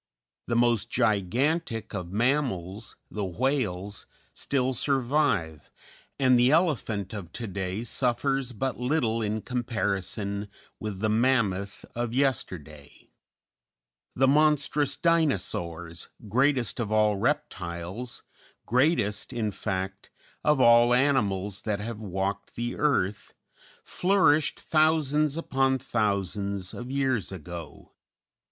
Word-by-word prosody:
The 120 Hz, -, 0 dB
most 120 Hz, -2 st, +3 dB
gigantic 115 Hz, -, 0 dB
of 90 Hz, -3 st, -5 dB
mammals 110 Hz, -, -1 dB, 0.2 s
the 105 Hz, -, -3 dB
whales 100 Hz, -2 st, -1 dB, 0.3 s
still 130 Hz, -1 st, -1 dB
survive, 130 Hz, -, 0 dB, 0.5 s
and 130 Hz, -2 st, +5 dB
the 125 Hz, +1 st, +5 dB
elephant 130 Hz, -, +1 dB
of 95 Hz, -6 st, -7 dB
to 120 Hz, -, -5 dB
day 95 Hz, +1 st, -3 dB
suffers 130 Hz, +2 st, 0 dB
but 125 Hz, +3 st, -3 dB
little 125 Hz, -4 st, +1 dB
in 105 Hz, 0 st, -2 dB
comparison 105 Hz, -4 st, -2 dB, 0.3 s
with 105 Hz, -3 st, -5 dB
the 110 Hz, -, +1 dB
mammoth 105 Hz, -4 st, +1 dB
of 120 Hz, 0 st, -3 dB
yesterday; 85 Hz, -, -3 dB, 1.0 s
the 135 Hz, +1 st, +3 dB
monstrous 145 Hz, -1 st, +3 dB
Dinosaurs, 90 Hz, -, 0 dB, 0.2 s
greatest 125 Hz, -2 st, +1 dB
of 110 Hz, -3 st, -2 dB
all 105 Hz, -1 st, +3 dB
reptiles 100 Hz, -, -3 dB, 0.4 s
greatest, 120 Hz, -5 st, +1 dB
in 110 Hz, -3 st, -1 dB
fact, 95 Hz, 0 st, -4 dB, 0.3 s
of 150 Hz, -2 st, +3 dB
all 120 Hz, 0 st, +6 dB
animals 105 Hz, -8 st, +1 dB
that 105 Hz, -2 st, -2 dB
have 110 Hz, +1 st, -5 dB
walked 95 Hz, 0 st, -3 dB
the 120 Hz, +1 st, -3 dB
earth 105 Hz, -10 st, 0 dB, 0.5 s
flourished 180 Hz, -5 st, +2 dB
thousands 155 Hz, -1 st, +2 dB
upon 135 Hz, -4 st, +1 dB
thousands 100 Hz, -5 st, -1 dB
of 120 Hz, +1 st, -7 dB
years 130 Hz, -8 st, 0 dB
ago. 85 Hz, -3 st, -9 dB
115 Hz, 105 wpm, -27 LUFS, 100-135 Hz, 1.0 s, all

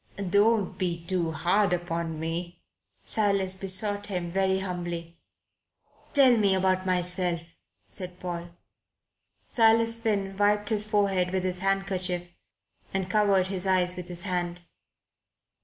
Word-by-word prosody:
"Don't 205 Hz, -2 st, +2 dB
be 170 Hz, -3 st, -2 dB
too 170 Hz, -3 st, 0 dB
hard 180 Hz, +5 st, +1 dB
upon 170 Hz, -2 st, -3 dB
me," 170 Hz, +2 st, -4 dB, 0.5 s
Silas 200 Hz, -3 st, +2 dB
besought 195 Hz, +2 st, +1 dB
him 180 Hz, -4 st, -3 dB
very 190 Hz, +1 st, +1 dB
humbly. 175 Hz, -3 st, -5 dB, 1.0 s
"Tell 265 Hz, -3 st, +7 dB
me 200 Hz, -3 st, +3 dB
about 185 Hz, 0 st, +1 dB
myself," 180 Hz, -1 st, +1 dB, 0.4 s
said 180 Hz, -1 st, -5 dB
Paul. 175 Hz, -1 st, -4 dB, 1.0 s
Silas 230 Hz, 0 st, +3 dB
Finn 200 Hz, -4 st, -1 dB
wiped 205 Hz, 0 st, +2 dB
his 215 Hz, -2 st, +1 dB
forehead 200 Hz, -4 st, +1 dB
with 185 Hz, 0 st, -1 dB
his 185 Hz, -1 st, -3 dB
handkerchief 190 Hz, -2 st, -1 dB, 0.7 s
and 190 Hz, -1 st, -2 dB
covered 200 Hz, -3 st, +3 dB
his 190 Hz, -1 st, -1 dB
eyes 180 Hz, -1 st, +2 dB
with 180 Hz, -1 st, -7 dB
his 175 Hz, 0 st, -7 dB
hand. 175 Hz, -2 st, -2 dB
185 Hz, 125 wpm, -27 LUFS, 175-200 Hz, 1.0 s, Tell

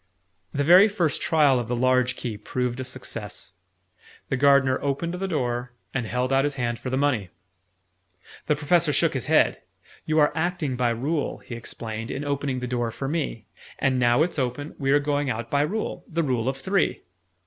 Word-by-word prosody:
The 145 Hz, -, 0 dB
very 180 Hz, +7 st, +8 dB
first 180 Hz, -9 st, 0 dB
trial 145 Hz, -5 st, +4 dB
of 120 Hz, -, -4 dB
the 120 Hz, -, -1 dB
large 130 Hz, 0 st, +2 dB
key 120 Hz, -4 st, -4 dB
proved 125 Hz, +4 st, -3 dB
a -, -, -2 dB
success: 115 Hz, -6 st, -6 dB, 0.8 s
the -, -, +1 dB
Gardener 140 Hz, -1 st, +4 dB
opened 145 Hz, +5 st, -1 dB
the 190 Hz, +2 st, -3 dB
door, 125 Hz, -6 st, -2 dB, 0.2 s
and 125 Hz, -4 st, -2 dB
held 125 Hz, +3 st, -1 dB
out 135 Hz, 0 st, +4 dB
his 145 Hz, -1 st, -1 dB
hand 120 Hz, -3 st, -2 dB
for 130 Hz, -, -5 dB
the 130 Hz, -, 0 dB
money. 130 Hz, -10 st, +1 dB, 1.2 s
The 150 Hz, -, +3 dB
Professor 155 Hz, +1 st, +2 dB
shook 160 Hz, +3 st, +2 dB
his 130 Hz, -6 st, -2 dB
head. -, -, +3 dB, 0.5 s
"You 155 Hz, 0 st, +1 dB
are 150 Hz, -1 st, +5 dB
acting 160 Hz, -5 st, -1 dB
by 125 Hz, -1 st, +1 dB
Rule," 140 Hz, +7 st, -1 dB
he -, -, -10 dB
explained, 115 Hz, -1 st, -6 dB
"in 140 Hz, +2 st, -4 dB
opening 140 Hz, -2 st, -2 dB
the 125 Hz, -, -3 dB
door 120 Hz, -1 st, -1 dB
for 135 Hz, +4 st, -5 dB
me. 140 Hz, -8 st, -3 dB, 0.3 s
And 130 Hz, -2 st, +1 dB
now 120 Hz, +4 st, +4 dB
it's 165 Hz, -3 st, -2 dB
open, 130 Hz, +3 st, -3 dB
we 135 Hz, -1 st, +1 dB
are 145 Hz, -, +6 dB
going 145 Hz, -1 st, 0 dB
out 115 Hz, -1 st, -4 dB
by 140 Hz, -, +3 dB
Rule 205 Hz, +9 st, -2 dB
the 165 Hz, -1 st, -1 dB
Rule 125 Hz, -4 st, 0 dB
of 135 Hz, -, -3 dB
Three." 190 Hz, +8 st, 0 dB
135 Hz, 190 wpm, -25 LUFS, 125-150 Hz, 1.2 s, very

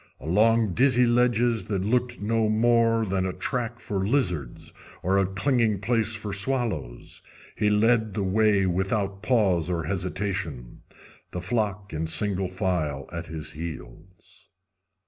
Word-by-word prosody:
Along 105 Hz, -, +2 dB
dizzy 125 Hz, +2 st, +4 dB
ledges 120 Hz, -1 st, +2 dB
that 100 Hz, -3 st, -2 dB
looked 125 Hz, +2 st, 0 dB
no 110 Hz, +1 st, +1 dB
more 115 Hz, 0 st, +3 dB
than 95 Hz, -1 st, -1 dB
a -, -, -2 dB
track 120 Hz, +2 st, -3 dB
for 100 Hz, -4 st, -3 dB
lizards 90 Hz, -, -1 dB, 0.3 s
or 95 Hz, +2 st, +2 dB
a 95 Hz, -, +2 dB
clinging 110 Hz, +1 st, +1 dB
place 110 Hz, +1 st, 0 dB
for 105 Hz, -3 st, -5 dB
swallows, 95 Hz, -, -2 dB, 0.3 s
he 105 Hz, -1 st, +1 dB
led 110 Hz, 0 st, +2 dB
the 100 Hz, -, -1 dB
way 100 Hz, 0 st, +3 dB
without 95 Hz, +2 st, -1 dB
pause 95 Hz, -10 st, +2 dB
or 85 Hz, -2 st, -1 dB
hesitation, 90 Hz, -8 st, -4 dB, 0.5 s
the 90 Hz, -, -5 dB
flock 100 Hz, 0 st, -2 dB
in 80 Hz, +1 st, -2 dB
single 95 Hz, +3 st, +1 dB
file 90 Hz, -7 st, -2 dB
at 85 Hz, 0 st, -5 dB
his 80 Hz, -1 st, -5 dB
heels. 80 Hz, +2 st, -10 dB
100 Hz, 135 wpm, -25 LUFS, 90-115 Hz, 0.5 s, dizzy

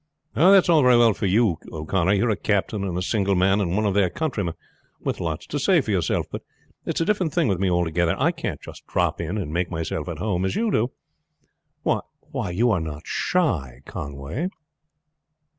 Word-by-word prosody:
"That's 190 Hz, +4 st, +6 dB
all 165 Hz, -3 st, +5 dB
very 125 Hz, -2 st, +6 dB
well 115 Hz, -2 st, +5 dB
for 100 Hz, -, -2 dB
you, 95 Hz, -3 st, +2 dB
O'Connor. 85 Hz, +4 st, 0 dB
You 100 Hz, -, +2 dB
are 115 Hz, -, +2 dB
a -, -, +1 dB
captain 100 Hz, 0 st, -1 dB
and 90 Hz, -3 st, -2 dB
a 90 Hz, -, -1 dB
single 100 Hz, 0 st, +1 dB
man, 95 Hz, +3 st, +3 dB
and 90 Hz, -2 st, -1 dB
one 105 Hz, +1 st, +1 dB
of 100 Hz, -, +1 dB
their 100 Hz, -2 st, +3 dB
countrymen, 105 Hz, -, -2 dB, 0.5 s
with -, -, -2 dB
lots 80 Hz, -3 st, -3 dB
to 145 Hz, -, -3 dB
say 175 Hz, +5 st, +4 dB
for 120 Hz, -7 st, -2 dB
yourself; 95 Hz, -4 st, 0 dB
but -, -, -5 dB, 0.5 s
it -, -, -1 dB
is -, -, +1 dB
a -, -, +2 dB
different 185 Hz, -6 st, 0 dB
thing 170 Hz, -5 st, +3 dB
with 95 Hz, -5 st, 0 dB
me 95 Hz, -1 st, +1 dB
altogether. 85 Hz, -1 st, +1 dB
I -, -, +2 dB
can't -, -, -4 dB, 0.3 s
drop -, -, 0 dB
in 100 Hz, -, -3 dB
and 80 Hz, -7 st, -4 dB
make 85 Hz, +1 st, 0 dB
myself 80 Hz, -1 st, -3 dB
at 85 Hz, -, -5 dB
home 95 Hz, 0 st, -1 dB
as 95 Hz, -, -1 dB
you 225 Hz, -1 st, +1 dB
do." 120 Hz, -, +1 dB, 0.9 s
"Why, -, -, -3 dB
you 115 Hz, +7 st, +2 dB
are 95 Hz, -6 st, +1 dB
not 75 Hz, -1 st, -6 dB
shy, 95 Hz, -, -1 dB
Conway?" 70 Hz, -, -4 dB
100 Hz, 205 wpm, -24 LUFS, 85-120 Hz, 0.9 s, That's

